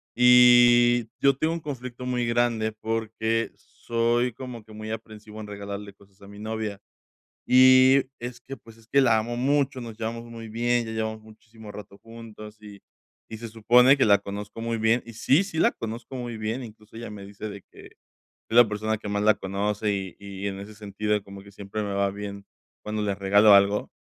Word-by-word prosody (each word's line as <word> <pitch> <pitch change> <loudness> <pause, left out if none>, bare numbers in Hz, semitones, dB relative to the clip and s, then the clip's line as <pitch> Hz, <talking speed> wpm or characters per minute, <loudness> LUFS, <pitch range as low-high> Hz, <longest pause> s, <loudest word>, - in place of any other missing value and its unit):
y 120 -1 +6
yo 140 -1 +4
tengo 160 +3 0
un 170 - -4
conflicto 125 -4 -7
muy 125 -1 -1
grande 115 -2 0
porque 110 +1 -2
soy 120 +1 -1
como 125 -2 -9
que 110 - -15
muy 110 0 -8
aprensivo 110 -1 -8
en - - -7
regalarle 100 0 -7
cosas 100 0 -24
a - - -13
mi 100 0 -12
novia, 110 -2 -4 0.7
y 130 +1 +6 0.2
es 120 0 -7
que, 135 +2 -9
pues, 115 -3 -17
es 115 -1 -21
que, 140 +4 +3
la 120 -4 +4
amo 120 +2 -3
mucho, 140 +1 0
nos 115 -2 -9
llevamos 115 +1 -4
muy 115 -1 -9
bien, 120 +1 0
ya 110 - -6
llevamos 110 0 -4
muchísimo 110 0 -14
rato 100 -1 -11
juntos 110 -2 -12
y 105 -1 -12 0.5
y 110 - -8
se 115 +1 -7
supone 120 +4 +5
que 135 - +3
la 100 -2 +5
conozco 100 +2 -8
muy 115 0 -2
bien, 115 +2 +2
y 115 - -11
sí, 140 - +3
sí 195 -5 -6
la - - +3
conozco 115 +3 -7
muy 120 -2 -5
bien, 110 +4 -3
incluso 110 -1 -13
ella 115 0 -7
me 105 -2 -9
dice 100 +2 -8
de 100 -2 -9
que, - - -14
es - - -23 0.4
la 120 -1 +8
persona 110 +1 -2
que 105 -1 -8
más 100 0 -1
la 110 0 +5
conoce 105 +2 -2
y 95 -2 -5
y 100 0 -6
en 95 -1 -5
ese 100 +2 -10
sentido 105 0 -2
como 100 0 -12
que 100 - -15
siempre 100 +1 -6
me 100 -1 -4
va 100 0 +1
bien 100 0 -7 0.4
cuando 105 0 -3
les 100 -1 -2
regalo 100 +2 +5
algo, 100 +1 +3
110 Hz, 200 wpm, -25 LUFS, 105-120 Hz, 0.7 s, la